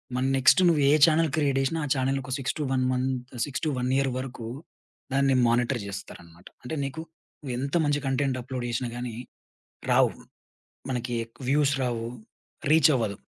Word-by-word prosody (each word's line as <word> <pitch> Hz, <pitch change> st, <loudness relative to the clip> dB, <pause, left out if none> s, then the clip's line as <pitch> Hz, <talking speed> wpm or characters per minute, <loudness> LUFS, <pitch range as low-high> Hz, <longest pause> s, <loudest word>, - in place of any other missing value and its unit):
మన 125 Hz, +1 st, 0 dB
నెక్స్ట్ 130 Hz, +8 st, +5 dB
నువ్వు 155 Hz, -4 st, +2 dB
ఏ -, -, +6 dB
channel 165 Hz, 0 st, +3 dB
create 140 Hz, -3 st, +2 dB
చేసినా, 150 Hz, +5 st, -1 dB
ఆ -, -, -4 dB
ఛానెలొక 135 Hz, 0 st, -1 dB
6-1 135 Hz, -1 st, -1 dB
మంత్ 130 Hz, -1 st, -2 dB
6-1 130 Hz, -3 st, -2 dB
ఇయర్ 135 Hz, -1 st, +1 dB
వరకు 125 Hz, -3 st, -6 dB, 0.7 s
దాన్ని 135 Hz, -1 st, +3 dB
మానిటర్ 120 Hz, 0 st, +1 dB
జేస్తారన్నమాట. 90 Hz, -3 st, -9 dB, 0.2 s
అంటే 125 Hz, +6 st, -4 dB
నీకు 140 Hz, +4 st, -4 dB, 0.4 s
నువ్వెంత 140 Hz, +2 st, -3 dB
మంచి 145 Hz, 0 st, +1 dB
కంటెంట్ 135 Hz, -1 st, 0 dB
అప్‌లోడ్ 130 Hz, -1 st, -5 dB
చేషినా 120 Hz, +1 st, -2 dB
గాని 120 Hz, -2 st, -5 dB, 0.8 s
రావు. -, -, +4 dB, 0.8 s
మనకి 120 Hz, -1 st, -2 dB
ఎక్కువ 115 Hz, +3 st, -13 dB
వ్యూస్ 145 Hz, 0 st, +3 dB
రావు 120 Hz, -2 st, -2 dB, 0.7 s
రీచవ్వదు. 135 Hz, -10 st, +4 dB
130 Hz, 140 wpm, -26 LUFS, 125-140 Hz, 0.8 s, ఏ